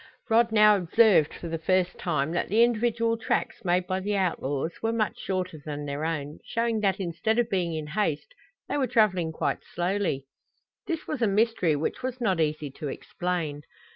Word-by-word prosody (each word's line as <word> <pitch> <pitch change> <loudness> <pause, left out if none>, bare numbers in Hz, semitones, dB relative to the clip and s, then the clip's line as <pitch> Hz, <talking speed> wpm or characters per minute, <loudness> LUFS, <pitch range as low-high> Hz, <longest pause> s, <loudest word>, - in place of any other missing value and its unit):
Rod 230 0 +4
now 210 -1 +6
observed 195 -3 +4
for 170 - -8
the 165 0 -3
first 180 +1 +1
time 155 -3 0
that 175 - -1
the 220 +4 +5
individual 230 -1 +1
tracks 225 - -2
made 180 0 +1
by 185 +1 -1
the 205 +2 -1
outlaws 160 -4 -1
were 225 - +1
much 225 -2 -1
shorter 185 -4 -3
than 145 -1 -5
their 145 +2 -3
own, 150 -2 -3
showing 230 -1 -1
that 200 -2 +1
instead 195 +5 -1
of 240 -1 +1
being 175 -4 0
in 155 -1 -3
haste 165 +2 -2 0.3
they - - -1
were 265 - +1
traveling 200 -8 +2
quite - - -2
slowly. 175 -6 -1 0.6
This 330 -4 -3
was 295 -5 -4
a 230 - +4
mystery 200 -6 +2
which 150 - -2
was 255 0 -4
not 190 -8 +1
easy 150 -2 -1
to 145 - -6
explain. 160 0 -3
185 Hz, 185 wpm, -27 LUFS, 160-225 Hz, 0.6 s, now